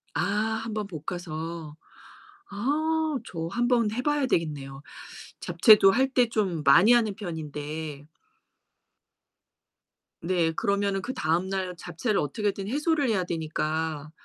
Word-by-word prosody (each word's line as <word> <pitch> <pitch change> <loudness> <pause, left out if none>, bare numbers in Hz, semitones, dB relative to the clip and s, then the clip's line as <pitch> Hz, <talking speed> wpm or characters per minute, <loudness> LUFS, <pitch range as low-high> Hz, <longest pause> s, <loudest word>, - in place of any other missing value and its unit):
아 205 +7 0
1 225 -1 -5
번 210 -2 -3
볶아서. 160 -2 -6 0.7
아 310 +6 0
저 165 -1 -5
한번 240 -1 +2
해 245 +3 -3
봐야 295 -2 +1
되겠네요. 140 - -2 0.6
잡채도 210 -4 +6
할 265 +4 +2
때 245 -3 +3
좀 190 -8 -1
많이 170 +11 +7
하는 225 -4 +3
편인데. 155 -5 -6 2.2
네. 170 -2 +1
그러면은 200 +1 0
그 255 - -4
다음날 185 -1 -1
잡채를 180 +6 -2
어떻게든 195 +6 -2
해소를 295 +1 +1
해야 195 -5 +1
되니까. 155 -2 -3
190 Hz, 225 characters per minute, -26 LUFS, 160-230 Hz, 2.2 s, 많이